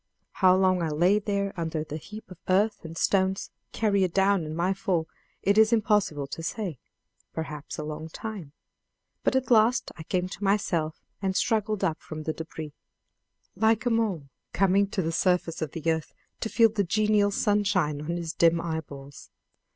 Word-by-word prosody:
How 185 Hz, -1 st, +4 dB
long 185 Hz, -1 st, +3 dB
I 165 Hz, -, 0 dB
lay 175 Hz, +7 st, +3 dB
there 200 Hz, -1 st, -2 dB
under 160 Hz, -2 st, -2 dB
the 155 Hz, 0 st, -6 dB
heap 210 Hz, +5 st, -11 dB
of 180 Hz, -, -11 dB
earth 205 Hz, +3 st, +2 dB
and 165 Hz, 0 st, -8 dB
stones 190 Hz, +1 st, +1 dB, 0.2 s
carried 200 Hz, -5 st, +1 dB
down 195 Hz, -2 st, +3 dB
in 155 Hz, 0 st, -5 dB
my 175 Hz, +3 st, +1 dB
fall 185 Hz, -5 st, -1 dB, 0.4 s
it 200 Hz, +2 st, +4 dB
is 220 Hz, +1 st, +6 dB
impossible 210 Hz, -10 st, +2 dB
to 140 Hz, +4 st, -7 dB
say: 170 Hz, -, -4 dB, 0.5 s
perhaps 150 Hz, -2 st, -6 dB
a 155 Hz, -, -4 dB
long 155 Hz, +1 st, -6 dB
time; 195 Hz, -5 st, -7 dB, 0.7 s
but -, -, +2 dB
at 260 Hz, -1 st, 0 dB
last 230 Hz, +2 st, +4 dB
I 165 Hz, -, -9 dB
came 180 Hz, +3 st, -1 dB
to 195 Hz, +2 st, -8 dB
myself 175 Hz, -6 st, 0 dB, 0.2 s
and 190 Hz, -1 st, -1 dB
struggled 215 Hz, -2 st, 0 dB
up 165 Hz, -4 st, 0 dB
from 155 Hz, -1 st, -7 dB
the 155 Hz, -, -2 dB
debris, 160 Hz, -2 st, -7 dB, 0.8 s
like 220 Hz, +4 st, +2 dB
a 245 Hz, -, +2 dB
mole 215 Hz, -9 st, 0 dB, 0.3 s
coming 195 Hz, +1 st, +3 dB
to 195 Hz, -2 st, -2 dB
the 165 Hz, -, -1 dB
surface 175 Hz, -1 st, +1 dB
of 155 Hz, -3 st, -3 dB
the 165 Hz, 0 st, 0 dB
earth 160 Hz, -1 st, -3 dB, 0.2 s
to 220 Hz, -, -2 dB
feel 230 Hz, 0 st, +5 dB
the 210 Hz, -2 st, 0 dB
genial 210 Hz, +2 st, +2 dB
sunshine 200 Hz, -8 st, +1 dB
on 170 Hz, +3 st, -3 dB
his 165 Hz, -2 st, -4 dB
dim 170 Hz, 0 st, +4 dB
eyeballs. 145 Hz, -5 st, -6 dB
185 Hz, 175 wpm, -27 LUFS, 160-205 Hz, 0.8 s, is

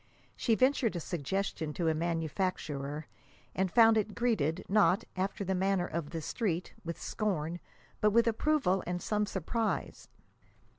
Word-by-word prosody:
She 230 Hz, -, +2 dB
ventured 255 Hz, -4 st, +2 dB
a -, -, -1 dB
suggestion 170 Hz, -1 st, -2 dB
to 170 Hz, 0 st, -1 dB
a 160 Hz, -, +3 dB
manufacturer, 160 Hz, -3 st, -2 dB, 0.5 s
and 190 Hz, 0 st, 0 dB
found 225 Hz, 0 st, +6 dB
it 210 Hz, 0 st, -3 dB
greeted, 190 Hz, -9 st, 0 dB
not, 205 Hz, +1 st, +4 dB
after 195 Hz, +2 st, -2 dB
the 190 Hz, -, 0 dB
manner 190 Hz, -1 st, +1 dB
of 165 Hz, -4 st, -4 dB
the 165 Hz, -1 st, -5 dB
Street, 180 Hz, -4 st, -2 dB
with 170 Hz, 0 st, -5 dB
scorn, 175 Hz, -6 st, -2 dB, 0.4 s
but 210 Hz, -, +4 dB
with 230 Hz, +2 st, +4 dB
approval 225 Hz, -5 st, +2 dB
and 180 Hz, 0 st, -1 dB
some 210 Hz, +2 st, 0 dB
surprise. 215 Hz, +4 st, -2 dB
190 Hz, 145 wpm, -31 LUFS, 165-215 Hz, 0.5 s, found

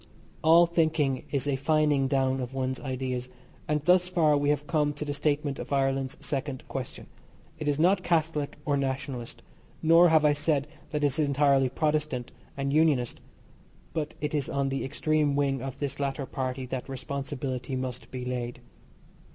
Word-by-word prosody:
All 165 Hz, +2 st, +7 dB
thinking 160 Hz, -5 st, +1 dB
is 140 Hz, 0 st, -1 dB
a 140 Hz, -, +1 dB
fining 145 Hz, 0 st, +2 dB
down 135 Hz, -1 st, +1 dB
of 125 Hz, +1 st, -5 dB
one's 130 Hz, 0 st, -1 dB
ideas, 130 Hz, -2 st, -3 dB, 0.4 s
and 150 Hz, -1 st, 0 dB
thus 180 Hz, +1 st, +5 dB
far 160 Hz, -5 st, +3 dB
we 145 Hz, 0 st, +1 dB
have 150 Hz, 0 st, +1 dB
come 150 Hz, -1 st, +1 dB
to 145 Hz, +1 st, -5 dB
the 145 Hz, -, -2 dB
statement 145 Hz, -1 st, -1 dB
of -, -, -7 dB
Ireland's 135 Hz, -1 st, 0 dB
second 135 Hz, -2 st, -3 dB
question. 130 Hz, -2 st, -6 dB, 0.5 s
It 155 Hz, -, -4 dB
is 145 Hz, -1 st, +2 dB
not 185 Hz, +4 st, +4 dB
Catholic 160 Hz, -4 st, 0 dB
or 145 Hz, -, +2 dB
Nationalist, 130 Hz, -3 st, -4 dB, 0.4 s
nor 165 Hz, +2 st, +7 dB
have 160 Hz, -1 st, +4 dB
I 150 Hz, -, +5 dB
said 145 Hz, -1 st, 0 dB, 0.2 s
that 150 Hz, -1 st, -2 dB
it -, -, +5 dB
is 140 Hz, +1 st, +1 dB
entirely 140 Hz, -2 st, +3 dB
Protestant 150 Hz, -3 st, -1 dB, 0.3 s
and 140 Hz, 0 st, -1 dB
Unionist, 150 Hz, -6 st, +2 dB, 0.7 s
but 150 Hz, -2 st, -3 dB
it 150 Hz, 0 st, -2 dB
is 145 Hz, -3 st, -1 dB
on 140 Hz, -1 st, 0 dB
the 135 Hz, 0 st, -2 dB
extreme 150 Hz, +1 st, +1 dB
wing 140 Hz, -2 st, +1 dB
of 135 Hz, -1 st, -5 dB
this 140 Hz, -1 st, -4 dB
latter 135 Hz, 0 st, -2 dB
party 130 Hz, -1 st, -3 dB
that 130 Hz, +1 st, -5 dB
responsibility 135 Hz, 0 st, -4 dB
must 130 Hz, -1 st, -4 dB
be 125 Hz, -1 st, -5 dB
laid. 120 Hz, -1 st, -3 dB
140 Hz, 170 wpm, -28 LUFS, 130-150 Hz, 0.7 s, All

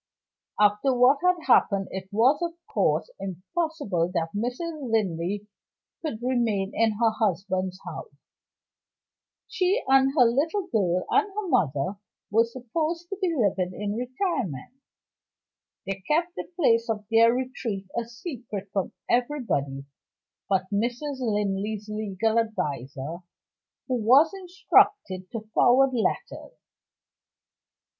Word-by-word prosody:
After 210 Hz, +5 st, +3 dB
what 255 Hz, +3 st, +5 dB
had 360 Hz, -2 st, +2 dB
happened, 200 Hz, -6 st, +3 dB
it 190 Hz, 0 st, -6 dB
was, 245 Hz, +10 st, +3 dB
of 340 Hz, -1 st, -2 dB
course, -, -, 0 dB
impossible 195 Hz, -, -2 dB
that 165 Hz, -1 st, -1 dB
Mrs. 260 Hz, +5 st, -3 dB
Linley 200 Hz, -1 st, -1 dB, 0.5 s
could 240 Hz, -8 st, -5 dB
remain 225 Hz, -6 st, 0 dB
in 225 Hz, -1 st, +2 dB
her 225 Hz, +1 st, +2 dB
husband's 190 Hz, -3 st, -1 dB
house. -, -, -7 dB, 1.4 s
She 385 Hz, +6 st, +1 dB
and 270 Hz, 0 st, +5 dB
her 250 Hz, -, +7 dB
little 315 Hz, -, +1 dB
girl, 185 Hz, -, 0 dB
and 415 Hz, 0 st, +3 dB
her 410 Hz, 0 st, -4 dB
mother, 175 Hz, -, 0 dB, 0.3 s
were 225 Hz, +2 st, +4 dB
supposed 310 Hz, +9 st, -3 dB
to 390 Hz, -, -4 dB
be 375 Hz, -, +2 dB
living 190 Hz, -, 0 dB
in 205 Hz, 0 st, -2 dB
retirement. 245 Hz, -, -3 dB, 1.1 s
They 195 Hz, 0 st, -4 dB
kept 340 Hz, +3 st, +1 dB
the -, -, -7 dB
place 230 Hz, -9 st, +3 dB
of 210 Hz, -2 st, -2 dB
their 230 Hz, +1 st, +6 dB
retreat 245 Hz, -5 st, -3 dB
a 235 Hz, -, 0 dB
secret 235 Hz, -, -7 dB
from 195 Hz, -2 st, -1 dB
everybody 230 Hz, -, -1 dB, 0.6 s
but 190 Hz, -1 st, +2 dB
Mrs. 245 Hz, +6 st, -2 dB
Linley's 210 Hz, -2 st, -1 dB
legal 215 Hz, +1 st, 0 dB
adviser, 150 Hz, -, -3 dB, 0.7 s
who 255 Hz, -2 st, 0 dB
was 270 Hz, -, +5 dB
instructed 360 Hz, -, +2 dB
to 225 Hz, -, -4 dB
forward 260 Hz, +2 st, +5 dB
letters. 250 Hz, -, -2 dB
230 Hz, 120 wpm, -26 LUFS, 195-275 Hz, 1.4 s, her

